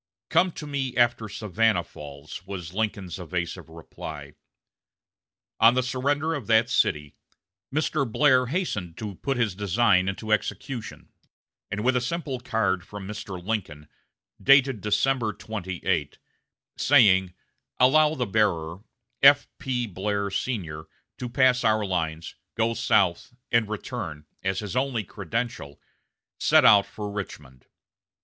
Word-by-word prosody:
"Come 185 0 +3
to 150 - -7
me 135 -4 -3
after 120 -2 +2
Savannah 105 -2 +1
falls," 75 0 -10
was 90 -4 -6
Lincoln's 100 -4 -3
evasive 85 -1 -4
reply. 80 -3 -9 1.3
On 115 +2 +6
the 130 - +2
surrender 140 +5 0
of 140 -8 -5
that 110 0 +3
city, 75 -1 +1 0.6
Mr. 145 -3 0
Blair 130 -2 +4
hastened 110 - -3
to 105 -2 -5
put 135 +8 -3
his 115 -5 +1
design 100 -1 +2
into 110 +3 -5
execution, 115 +2 -3 0.6
and 105 +1 -3
with 130 +1 +2
a 125 - +2
simple 135 0 -3
card 110 -7 0
from 100 +1 -9
Mr. 105 -3 -6
Lincoln, 85 -9 -3 0.5
dated 135 -5 +5
December 110 +2 +1
28, 95 -8 -3 0.6
saying, 95 -10 +4 0.4
"Allow 150 +4 +5
the 125 - -1
bearer, 95 -6 0 0.4
F.P. 135 -3 +3
Blair, 100 0 -2
Sr., 85 -13 -3 0.3
to 125 - -4
pass 125 0 +3
our 110 -2 +2
lines, 80 -3 -3 0.2
go 115 0 +1
south 95 0 +1 0.2
and 115 -3 +2
return," 100 - -5 0.2
as 95 +1 -1
his 105 +1 -6
only 130 -4 0
credential, 100 - -5 0.6
set - - +5
out 100 -1 +7
for 105 -1 -6
Richmond. 75 -10 -8
105 Hz, 125 wpm, -25 LUFS, 90-125 Hz, 1.3 s, out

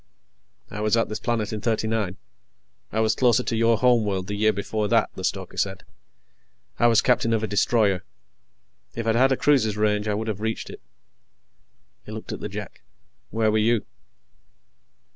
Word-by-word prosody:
"I 105 - -5
was 110 +2 +2
at 115 - +1
this 110 - -4
planet 115 -3 -2
in 105 - -4
'39. 110 -4 -1 0.7
I 110 - -1
was 110 0 +3
closer 125 0 +3
to 115 - -2
your 115 0 +3
home 125 -2 +4
world 95 -3 -2
the 100 - -5
year 110 +1 +3
before 105 +1 -2
that," - - +2
the - - -8
stoker - - -3
said. 95 -3 -2 1.0
"I 120 - +5
was 115 -1 +4
captain 115 -2 +2
of 110 -1 0
a - - 0
destroyer. 105 -2 +2 0.9
If 115 - -4
I'd 115 - +2
had 130 +3 +4
a 135 - +2
cruiser's 115 -8 +2
range, 105 0 +1
I 105 - 0
would 110 +2 -3
have 105 -2 -3
reached 110 0 -3
it." - - -11 1.2
He - - -11
looked - - -7
at - - -6
the - - -5
Jek. - - -8 0.5
"Where 110 -1 +1
were 110 - +2
you?" 115 0 +2
110 Hz, 180 wpm, -24 LUFS, 105-115 Hz, 1.2 s, I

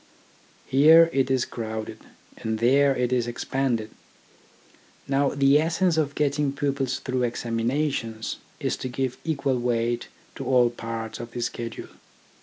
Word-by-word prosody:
Here 160 +5 +6
it 135 -1 +1
is 130 -2 +2
crowded, 110 -1 -5 0.4
and 110 0 -2
there 135 +4 +4
it 125 0 0
is 120 -2 +1
expanded. 120 -2 -2 1.2
Now 140 0 +2
the 140 +1 +5
essence 170 +2 +1
of 145 -3 0
getting 145 -1 0
pupils 135 -2 -1
through 130 -1 -2
examinations 115 0 -2 0.2
is - - -1
to 130 - -5
give 130 0 -3
equal 140 -5 0
weight 120 0 -1 0.3
to - - -5
all 125 -2 +4
parts 115 -1 -6
of 120 0 -6
the 120 - -4
schedule. 115 -1 -5
130 Hz, 135 wpm, -25 LUFS, 120-140 Hz, 1.2 s, Here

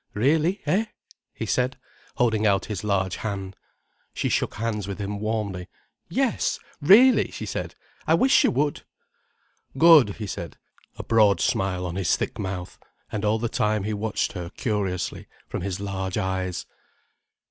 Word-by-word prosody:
"Really, 155 - +2
eh?" 210 +5 +2 0.5
he 110 - -5
said, 125 +4 0 0.4
holding 110 -4 +2
out 100 -1 +2
his 105 -4 -5
large 95 -3 0
hand. 100 -3 -4 0.6
She - - -1
shook - - 0
hands 105 -2 -2
with 100 - -4
him 100 0 -4
warmly. 105 -4 -3 0.4
"Yes, - - 0 0.2
really!" 225 - +6
she - - -6
said. - - -4 0.3
"I - - +5
wish 265 +1 +4
you - - +4
would." 145 +3 0 1.0
"Good," 150 - +7
he 110 - -5
said, 85 -3 -6 0.4
a - - -5
broad 105 -3 +4
smile 90 -1 0
on 90 +1 -4
his 95 -5 +2
thick - - -4
mouth. 95 -3 -5 0.3
And 105 -1 -3
all 105 +1 +2
the 120 +1 -1
time 105 -2 0
he 105 +2 -2
watched 105 +1 -2
her 85 -1 -5
curiously, 100 -5 -3 0.2
from - - -4
his 95 0 -3
large 95 -2 -3
eyes. 95 -1 -2
105 Hz, 155 wpm, -25 LUFS, 95-115 Hz, 1.0 s, Good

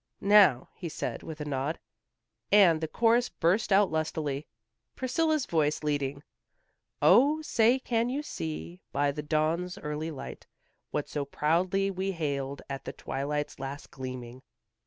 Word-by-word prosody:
"Now," 185 -12 +6
he 175 - -6
said, - - -4
with 160 -1 -8
a - - -3
nod, 140 +2 -2 0.7
and 180 -6 +6
the 160 - -1
chorus 235 +7 +3
burst 185 +7 +1
out 195 -1 +5
lustily, 155 -2 -2 0.5
Priscilla's 310 +3 +1
voice 155 -2 0
leading. 145 -1 -1 0.8
"O, 295 +5 +5
say, 240 -3 +3
can 235 -2 0
you 280 +4 -2
see 80 - -6
by 145 0 +1
the 150 +1 -5
dawn's 160 +4 0
early 150 +2 -4
light, 150 -4 -8 0.4
What 145 - -2
so 145 - -2
proudly 180 +7 +1
we 190 +1 -2
hailed 140 -4 -3
at 135 -1 -6
the - - -5
twilight's 145 +2 -3
last 135 +1 -6
gleaming." 130 -1 -7
155 Hz, 140 wpm, -29 LUFS, 140-195 Hz, 0.8 s, Now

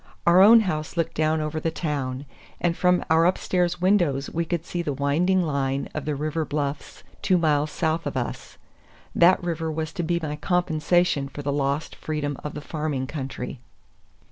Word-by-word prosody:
Our 175 +2 +6
own 225 +3 +8
house 155 -5 -3
looked 165 - 0
down 155 0 +1
over 155 +1 -2
the 165 - -1
town, 145 -5 -3 0.3
and 170 -1 +1
from 180 0 +2
our 160 +1 +4
upstairs 180 -1 0
windows 175 -8 +2
we 170 +1 -1
could 170 0 -3
see 175 - -3
the 150 -4 -2
winding 165 +7 +1
line 140 -3 -1
of 155 - -4
the 150 -1 -1
river 155 +3 -2
bluffs, 145 -1 -4 0.2
two 185 -2 +3
miles 150 -3 +2
south 160 +2 -1
of - - -3
us. 120 - -5 0.6
That 180 +2 +5
river 165 -2 -2
was 160 +1 -4
to - - -3
be 170 +1 0
my 150 -2 -4
compensation 175 -2 +1
for 145 - -8
the 140 0 -1
lost 140 +2 -1
freedom 150 -2 -3
of 150 - -5
the 150 - -5
farming 150 -4 -3
country. 135 -3 -6
155 Hz, 180 wpm, -24 LUFS, 145-175 Hz, 0.6 s, own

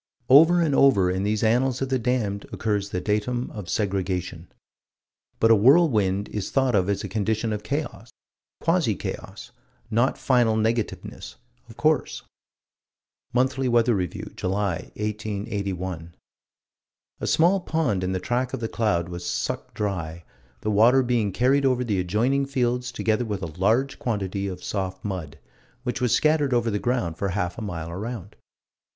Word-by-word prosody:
Over 165 +6 +7
and 155 -4 +1
over 100 -11 +4
in 95 +1 -1
these 105 +2 0
annals 125 +3 +2
of 135 - -2
the 130 -1 +1
damned 115 -5 -1
occurs 105 -2 -1
the 90 - -2
datum 105 +6 -1
of 100 -5 -8
segregation. 95 -4 -2 0.9
But 115 - +5
a - - +8
whirlwind 105 - +4
is 105 -3 -4
thought 135 -2 +1
of 95 -2 +2
as 100 - -1
a - - -3
condition 110 +1 -1
of 105 - -3
chaos 140 -5 -4 0.5
quasi 165 - +2
chaos: - - -7 0.4
not 120 +4 +2
final 120 -4 +2
negativeness, 110 - -2 0.3
of - - -13
course - - +1 1.1
Monthly 130 +1 +1
Weather 120 0 +3
Review, 90 -5 -3
July, 95 -2 -2
1881: 100 -5 -4 1.0
"A - - -3
small 175 +5 +4
pond 160 - -1
in 90 - -1
the 95 - -1
track 125 +5 -1
of - - -7
the 115 - -2
cloud 105 -8 0
was 85 0 -7
sucked - - -3
dry, 85 -5 -3 0.4
the 110 - -1
water 120 +6 +5
being 120 -5 +1
carried 130 +7 +2
over 130 -2 +2
the 105 -6 -1
adjoining 120 +10 +1
fields 125 -2 -1
together 110 0 0
with 105 -5 -4
a 85 +1 -7
large 115 +8 +1
quantity 100 -4 -2
of 90 -2 -6
soft 95 -1 -4
mud, 90 -8 -5 0.5
which 125 -2 -3
was 125 -2 +1
scattered 150 -4 +3
over 120 -1 +1
the 105 - -1
ground 100 -10 -1
for 100 - -1
half 90 +1 -2
a - - -6
mile 85 -6 -5
around." 100 +1 -6
110 Hz, 155 wpm, -24 LUFS, 95-125 Hz, 1.1 s, a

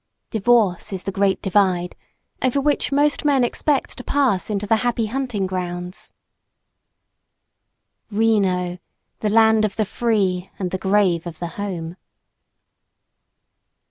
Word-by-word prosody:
Divorce 220 -5 +2
is 190 -2 -4
the 195 - -3
Great 195 -1 0
Divide, 185 -3 +1 0.5
over 260 +2 +1
which 290 +1 +1
most 290 +2 +2
men 280 -4 +3
expect 275 +3 0
to - - -7
pass 260 -11 +1
into 205 -1 -2
the 220 +2 +3
Happy 235 -1 0
Hunting 235 -4 -2
Grounds. 180 -1 -5 2.0
Reno! 195 -5 +1 0.4
The 215 - 0
land 220 0 +4
of 215 - -1
the 215 - 0
free 195 -5 0
and 185 -2 -3
the 185 - -2
grave 190 -4 +2
of 165 -2 -7
the 175 - -4
home! 175 -4 -5
205 Hz, 125 wpm, -21 LUFS, 185-230 Hz, 2.0 s, land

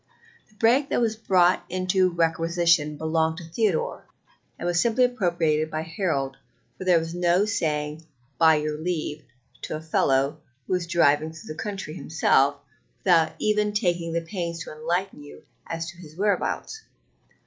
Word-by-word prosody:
The 215 - -26
break 245 +6 +3
that - - +1
was 225 -2 +1
brought 185 -4 +3
into 185 0 +2
requisition 165 -2 +1
belonged 160 +1 0
to 175 - -7
Theodore, 190 0 -1 0.5
and - - -6
was 175 0 +2
simply 235 +2 +2
appropriated 170 -10 +1
by 155 0 -3
Harold, 160 -6 -2 0.4
for 185 - -8
there 180 -2 +5
was 165 0 -3
no 175 +2 +2
saying 155 -6 -2 0.3
"by 160 -1 +6
your 150 0 -2
leave" 155 -3 -3 0.4
to - - -4
a - - -4
fellow 140 -3 +1 0.3
who - - -2
went 180 -2 -1
driving 155 -2 +3
through 160 -1 -8
the 155 - -7
country 195 -7 -5
himself 145 -4 +2 0.5
without 170 -4 +4
even 210 -1 +1
taking 175 -5 0
the 170 +1 0
pains 170 -1 -4
to - - -9
enlighten 170 +2 -2
you 145 - -13 0.2
as 165 0 -4
to 175 - -20
his 155 -3 -13
whereabouts. 210 - -1
170 Hz, 160 wpm, -25 LUFS, 155-185 Hz, 0.5 s, by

